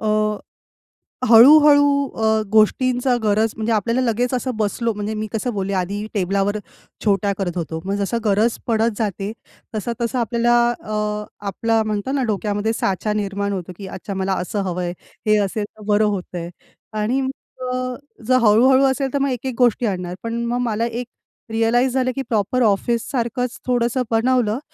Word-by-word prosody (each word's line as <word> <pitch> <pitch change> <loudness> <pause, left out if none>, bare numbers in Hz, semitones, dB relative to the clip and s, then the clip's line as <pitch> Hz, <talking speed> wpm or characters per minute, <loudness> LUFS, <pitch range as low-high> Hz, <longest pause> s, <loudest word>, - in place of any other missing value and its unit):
अ, 220 - -1 1.2
हळू-हळू 285 +5 +8 0.3
अ, 220 0 +2
गोष्टींचा 245 +3 +3
गरज 215 +1 +2
म्हणजे 220 +1 -2
आपल्याला 230 +4 +1
लगेच 245 +1 0
असं 255 +1 -1
बसलो 220 +2 0
म्हणजे 210 +1 -4
मी 215 0 -3
कसं 235 +2 -2
बोलले 200 -1 -2
आधी 200 +3 -2
टेबलावर 200 +1 0 0.5
छोट्या 200 0 +2
करत 180 -3 -3
होतो. 160 -1 -3
मग 195 - -1
जसा 205 +3 -1
गरज 215 +3 +2
पडत 225 -1 +1
जाते, 205 -2 -2 0.4
तसा-तसा 235 +3 -2
आपल्याला 235 +1 +1 0.2
अ, 210 -2 -3 0.2
आपला 225 +3 +1
म्हणतात 215 +4 -2
ना 275 -2 +1
डोक्यामध्ये 210 +1 -1
साचा 195 0 -1
निर्माण 200 -1 -2
होतो 185 -2 -5
की 195 -2 -8
अच्छा 190 +2 -6
मला 190 0 -1
असं 200 +3 -3
हवं 180 -1 -3
आहे, 175 0 -2 0.3
हे 215 0 +5
असेल 205 +2 -3
तर 215 +1 -18
बरं 210 +1 +3
होतं 190 -3 -3
आहे. 170 0 -5 0.5
आणि 245 +6 +1
मग 265 0 -1 0.4
अ, 255 0 -2 0.3
जर 255 0 +5
हळू-हळू 250 +5 +5
असेल 265 0 0
तर 280 - +2
मग 275 0 +1
एक-एक 255 0 -3
गोष्टी 245 -1 +3
आणणार. 180 -3 -3
पण 230 +1 -2
मग 240 +1 -1
मला 225 +2 0
एक 235 +1 -5 0.4
रिअलाईज 235 +3 +2
झालं 255 -1 +1
की 270 - -2
प्रॉपर 225 +3 +1
ऑफिससारखंच 235 +3 0
थोडंसं 245 +1 +1
बनवलं 230 -1 +2
220 Hz, 165 wpm, -21 LUFS, 205-245 Hz, 1.2 s, हळू-हळू